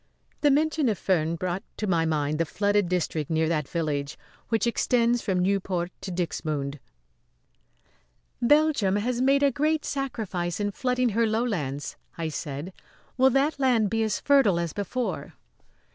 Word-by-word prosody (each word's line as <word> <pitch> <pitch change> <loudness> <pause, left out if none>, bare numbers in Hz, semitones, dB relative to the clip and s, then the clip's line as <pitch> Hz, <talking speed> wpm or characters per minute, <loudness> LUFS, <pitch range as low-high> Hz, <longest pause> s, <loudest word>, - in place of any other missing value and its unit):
The 290 - +4
mention 300 -1 +2
of 210 - 0
Furnes 170 -3 0
brought 180 +2 -2 0.2
to 215 - -2
my 170 -4 +1
mind 150 -1 0
the 165 - +2
flooded 205 +2 +1
district 165 -4 -1
near 160 0 +1
that 155 -4 0
village, 150 -4 -2 0.3
which 225 -1 +1
extends 235 0 +2
from 190 -2 -1
Nieuport 185 -2 0
to 190 - -5
Dixmude. 155 -5 -3 1.6
"Belgium 285 -7 +3
has 240 +4 -1
made 275 +2 +3
a 280 - +4
great 305 +3 0
sacrifice 215 -11 -3
in 205 0 0
flooding 250 +2 0
her 230 +2 +2
lowlands," 195 - -2 0.2
I 165 -1 -2
said. 150 +4 -5 0.4
"Will 260 +1 +5
that 280 +3 +1
land 235 -7 +2
be 225 - +1
as 220 -2 0
fertile 270 -11 +4
as 170 -2 -2
before?" 220 +5 -3
200 Hz, 150 wpm, -26 LUFS, 165-250 Hz, 1.6 s, Will